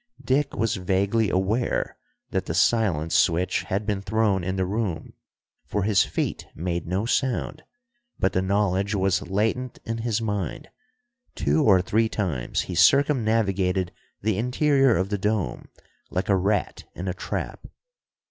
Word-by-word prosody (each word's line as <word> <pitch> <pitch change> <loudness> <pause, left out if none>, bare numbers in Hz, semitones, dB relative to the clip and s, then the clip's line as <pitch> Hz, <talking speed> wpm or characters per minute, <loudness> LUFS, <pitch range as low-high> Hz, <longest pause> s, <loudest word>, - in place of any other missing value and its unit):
Dick 140 +2 +1
was 115 0 0
vaguely 100 +4 +1
aware 100 +7 0 0.4
that - - -1
the - - -2
silence 85 -9 +2
switch 90 +1 +2
had 100 +3 -2
been 105 -2 -1
thrown 100 -2 +1
in 95 +2 -2
the 95 -1 0
room, 100 -4 -3 0.5
for 105 - -1
his 100 -3 +4
feet - - -3
made 85 0 -3
no 95 +5 -1
sound, 135 +4 -1 0.6
but 95 - +1
the 95 - +2
knowledge 100 +1 +1
was 95 -1 +1
latent 110 +7 -1
in 115 0 -3
his 115 -1 0
mind. 105 -6 -3 0.7
Two 75 +1 +2
or 95 -4 +5
three 110 +3 +1
times 80 - -2
he 90 - -6
circumnavigated 105 - +3 0.3
the 105 -2 +1
interior 135 +1 +3
of 95 +1 -1
the 100 -1 -1
dome, 105 - -1 0.4
like 90 +3 -2
a 100 - +5
rat 100 +2 0
in 90 - -5
a 90 - -1
trap. 95 - -5
100 Hz, 150 wpm, -25 LUFS, 95-110 Hz, 0.7 s, or